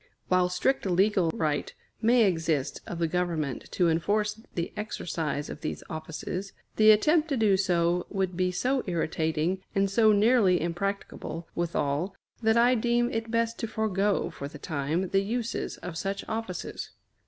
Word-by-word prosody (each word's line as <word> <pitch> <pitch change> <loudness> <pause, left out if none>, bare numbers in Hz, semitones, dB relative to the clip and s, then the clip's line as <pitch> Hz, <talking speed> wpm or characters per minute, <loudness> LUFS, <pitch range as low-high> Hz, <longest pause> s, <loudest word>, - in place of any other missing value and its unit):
While 185 -1 +3
strict 195 +6 0
legal 190 -1 +3
right 155 -2 -1 0.3
may 235 +1 +5
exist 165 -7 0
of 175 - -5
the 165 -1 +1
Government 160 -6 -2
to 180 - +3
enforce 210 +6 0
the 170 -1 -2
exercise 165 -8 -3
of 150 - -8
these 155 - -4
offices, 160 +4 -5 0.2
the 215 0 +7
attempt 305 +10 +5
to 275 - 0
do 215 -4 +4
so 175 -2 +1
would 190 -3 -1
be 180 0 +1
so 255 +8 0
irritating, 160 +1 0
and 195 0 +2
so 220 +1 +5
nearly 210 -3 +4
impracticable 175 -1 -3
withal, 170 +1 -1 0.3
that 220 0 +3
I 240 +2 +5
deem 240 +1 +1
it 225 0 -3
best 230 0 0
to 230 - -2
forego, 210 -2 0
for 140 - -6
the 150 - -10
time, 155 +4 -2
the 195 - +3
uses 230 +3 -3
of 180 -2 -7
such 195 0 -3
offices. 220 -5 -4
185 Hz, 155 wpm, -28 LUFS, 170-220 Hz, 0.3 s, the